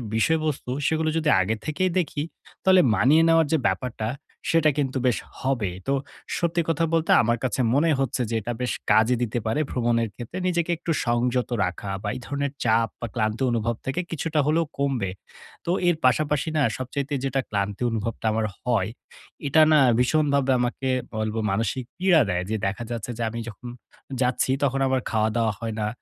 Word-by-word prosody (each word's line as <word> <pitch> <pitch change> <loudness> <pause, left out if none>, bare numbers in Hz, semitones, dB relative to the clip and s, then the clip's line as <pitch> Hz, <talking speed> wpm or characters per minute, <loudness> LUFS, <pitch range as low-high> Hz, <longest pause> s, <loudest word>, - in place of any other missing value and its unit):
বিষয়বস্তু, 155 +1 0 0.2
সেগুলো 160 0 +1
যদি 160 -2 +1
আগে 105 +4 0
থেকেই 180 +5 0
দেখি, 150 -4 -2 0.4
তাহলে 185 -1 +6
মানিয়ে 150 +8 +5
নেওয়ার 165 -1 +4
যে - - +5
ব্যাপারটা 110 +2 -2 0.4
সেটা 165 -2 +4
কিন্তু 135 -2 0
বেশ 125 - +2 0.2
হবে। 130 -7 0 0.2
তো 135 - +2 0.4
সত্যি 170 0 +1
কথা 165 +1 +2
বলতে 165 -1 +2
আমার 115 +1 +1
কাছে 130 0 0
মনে 150 +5 +3
হচ্ছে 135 -1 0
যে 115 - -1
এটা 120 +4 -3
বেশ 125 - 0 0.2
কাজে 110 +3 +4
দিতে 120 0 -1
পারে 110 +7 0
ভ্রমণের 115 -2 +1
ক্ষেত্রে 120 +9 -7
নিজেকে 175 -1 0
একটু 170 +1 -3
সংযত 120 +1 +1 0.2
রাখা 90 +2 -5
বা 105 - -1
এই - - -5
ধরণের 140 -1 -2
চাপ 115 0 +3
বা 120 - -3
ক্লান্তি 110 +2 -1
অনুভব 115 0 0
থেকে 135 +5 -2
কিছুটা 165 0 -1
হলেও 165 +2 +2
কমবে। 135 -8 0 0.6
তো 170 - 0 0.2
এর 175 - +4
পাশাপাশি 150 +4 +2
না - - +3 0.2
সবচাইতে 140 +3 -4
যেটা 135 0 0
ক্লান্তি 100 0 -2
অনুভবটা 115 0 -3
আমার 110 0 0 0.2
হয়, 115 -5 +1 0.6
এটা 150 +3 +5
না 155 - +6 0.2
ভীষণভাবে 140 0 +2
আমাকে 125 +2 -1 0.3
বলব 110 0 -2 0.2
মানসিক 115 +5 -1
পীড়া 180 -3 +4
দেয় 90 0 0
যে, 110 - 0
দেখা 100 +5 -3
যাচ্ছে 115 0 -4
যে 120 - -2
আমি 115 +1 -5
যখন 115 +3 -10 0.5
যাচ্ছি 125 +1 +1
তখন 135 -1 +1
আমার 130 -1 +1
খাওয়া-দাওয়া 110 0 +1
হয় 115 -1 -3
না। 105 - 0
125 Hz, 175 wpm, -24 LUFS, 115-155 Hz, 0.6 s, তাহলে